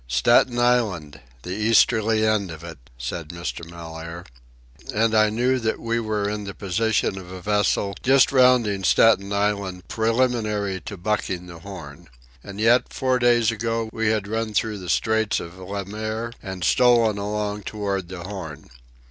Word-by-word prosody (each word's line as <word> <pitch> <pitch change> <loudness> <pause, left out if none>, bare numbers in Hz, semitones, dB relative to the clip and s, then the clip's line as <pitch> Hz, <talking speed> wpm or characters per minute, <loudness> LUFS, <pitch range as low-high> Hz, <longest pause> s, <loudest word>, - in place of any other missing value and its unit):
"Staten 120 - +3
Island, 110 - 0 0.2
the 90 - -6
easterly 110 +1 +3
end 105 -3 +1
of 80 0 -9
it," 85 -4 -9 0.2
said 70 +6 -5
Mr. 85 0 -5
Mellaire. 85 0 -8 0.7
And 110 +1 +1
I 110 -1 +4
knew 125 +4 +1
that 110 -2 -1
we 115 0 -1
were 110 -2 -1
in 105 0 -3
the 100 - -7
position 100 0 0
of 90 -1 -11
a 95 - -7
vessel 105 0 0
just 135 +1 +4
rounding 125 -7 +4
Staten 100 0 +4
Island 100 -3 -1
preliminary 110 -4 0
to 100 - -6
bucking 95 -2 -2
the 85 -1 -11
Horn. 85 -3 -10 0.3
And, 100 0 -9
yet, 120 +3 +3
four 130 -1 0
days 120 -2 +3
ago, 115 0 -2
we 110 0 -1
had 105 -2 0
run 110 0 -3
through 105 0 0
the 90 -2 -8
Straits 110 +1 +1
of 85 +2 -9
Le 100 +1 -5
Maire 110 +3 -4
and 95 -2 -6
stolen 115 0 +4
along 105 0 -3
toward 100 -2 -3
the 90 -1 -8
Horn. 90 -6 -8
105 Hz, 160 wpm, -23 LUFS, 95-115 Hz, 0.7 s, I